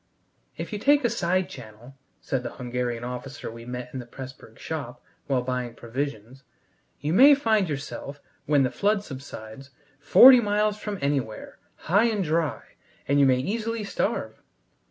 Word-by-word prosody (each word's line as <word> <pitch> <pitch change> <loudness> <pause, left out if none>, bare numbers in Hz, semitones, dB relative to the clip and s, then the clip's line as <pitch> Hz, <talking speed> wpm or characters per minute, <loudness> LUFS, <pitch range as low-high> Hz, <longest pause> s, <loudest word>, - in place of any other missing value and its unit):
"If - - -6
you 210 - -3
take 285 +5 +4
a 240 - +2
side 185 +1 0
channel," 120 +1 -12 0.3
said 130 - -2
the 120 - -5
Hungarian 125 -1 -3
officer 125 +1 -6
we 115 0 -11
met 125 0 -7
in 130 - -4
the 120 - -9
Pressburg 130 +2 -11
shop - - -6 0.3
while 130 -3 +1
buying 125 -2 -3
provisions, 125 0 -5 0.6
"you 150 +3 -2
may 275 +8 +8
find 220 - +1
yourselves, 140 0 -6 0.3
when 145 -2 +4
the 130 - 0
flood 205 0 +1
subsides, 135 - -9 0.3
forty 250 - +8
miles 210 -1 0
from 210 -2 -4
anywhere, 135 -6 -3 0.2
high 200 +7 +2
and 215 -4 0
dry, 160 -1 -1 0.4
and 140 +1 +3
you 140 - +6
may 130 -1 +4
easily 220 - -2
starve. 200 - -3
140 Hz, 155 wpm, -25 LUFS, 125-205 Hz, 0.6 s, may